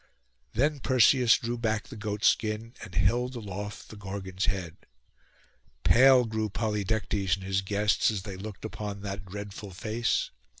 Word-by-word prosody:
Then 145 +5 +1
Perseus 125 -1 +5
drew 120 +1 -3
back 110 -2 -1
the 130 - -8
goat 105 0 -4
skin, 110 +1 +1
and 95 - -9
held 120 +6 +2
aloft 105 -2 -6
the - - -10
Gorgon's 95 -1 -4
head. 90 -4 -2 1.1
Pale 130 0 +6
grew 110 -1 -2
Polydectes 105 -2 0
and 95 - -11
his 95 0 0
guests 105 +2 +2
as 105 -4 -2
they 100 -3 -6
looked 100 +2 -8
upon 105 -2 -5
that 100 0 -5
dreadful 100 +1 -7
face. 110 +5 -1
105 Hz, 145 wpm, -28 LUFS, 100-115 Hz, 1.1 s, Pale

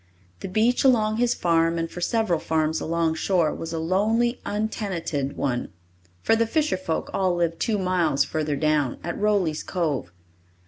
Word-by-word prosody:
The - - -5
beach 220 +6 +2
along 220 -5 +3
his 245 0 +2
farm 165 -1 +2
and 165 0 -1
for 175 - -9
several 220 -4 +1
farms 160 0 0
along 165 0 0
shore 165 -1 +1
was 165 - -6
a 165 - -3
lonely, 215 +9 +1
untenanted 190 -9 -2
one, 125 -5 -2 0.5
for - - +4
the 230 0 +1
fisher 305 - +1
folk 185 -3 -3
all 185 -2 +1
lived 170 -1 -1
two 220 -2 0
miles 175 -7 +1
further 155 -1 -2
down, 150 -3 +1
at 170 - -3
Rowley's 200 -7 +1
Cove. 150 - -2
170 Hz, 165 wpm, -24 LUFS, 160-215 Hz, 0.5 s, for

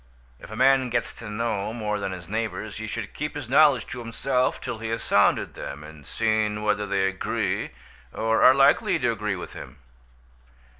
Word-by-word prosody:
If - - -12
a 110 - -7
man 130 +1 +4
gets 120 0 -1
to 115 - -9
know 105 -1 -2
more 105 -3 -2
than 100 -1 -3
his 90 -2 -8
neighbours 110 -1 -4
he 110 0 -5
should 110 -1 -5
keep 150 +1 -4
his 145 -5 -5
knowledge 140 -2 +5
to - - -6
himself 125 +2 -1
till 110 - -5
he 110 0 -4
has 115 0 -3
sounded - - +2
them, 70 +2 -7
and 75 -2 -13
seen 110 -1 0
whether 105 -1 0
they 100 -1 +1
agree, 95 -1 -1 0.4
or 110 0 0
are 130 - +8
likely 135 0 +4
to - - +1
agree - - -2
with - - -8
him. - - -10
110 Hz, 190 wpm, -25 LUFS, 105-120 Hz, 0.4 s, are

